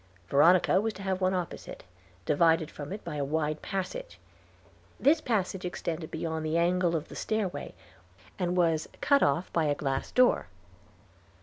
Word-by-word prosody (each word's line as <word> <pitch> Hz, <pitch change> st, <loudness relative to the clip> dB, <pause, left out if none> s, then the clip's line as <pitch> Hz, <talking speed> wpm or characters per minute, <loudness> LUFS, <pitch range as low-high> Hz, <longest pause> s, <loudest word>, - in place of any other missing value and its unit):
Veronica 175 Hz, +6 st, +5 dB
was 220 Hz, 0 st, -1 dB
to 195 Hz, -, -9 dB
have 190 Hz, -1 st, -1 dB
one 185 Hz, 0 st, +2 dB
opposite, 180 Hz, -3 st, -5 dB, 0.4 s
divided 160 Hz, +1 st, +3 dB
from 145 Hz, +3 st, -8 dB
it 205 Hz, +2 st, -6 dB
by 150 Hz, -3 st, -5 dB
a 145 Hz, -, -1 dB
wide 155 Hz, +1 st, -1 dB
passage. 210 Hz, -, -5 dB, 0.8 s
This 310 Hz, +4 st, +4 dB
passage 195 Hz, -5 st, -1 dB
extended 170 Hz, -2 st, -4 dB
beyond 160 Hz, -1 st, -3 dB
the 155 Hz, +1 st, 0 dB
angle 175 Hz, 0 st, +2 dB
of 155 Hz, -1 st, -3 dB
the -, -, -11 dB
stairway, 200 Hz, -9 st, -3 dB, 0.6 s
and 180 Hz, 0 st, 0 dB
was 165 Hz, -3 st, +2 dB
cut 280 Hz, -1 st, +3 dB
off 145 Hz, +6 st, +1 dB
by 165 Hz, -2 st, +2 dB
a 145 Hz, -1 st, +1 dB
glass 135 Hz, -2 st, -2 dB
door. 250 Hz, 0 st, +3 dB
175 Hz, 160 wpm, -29 LUFS, 155-190 Hz, 0.8 s, Veronica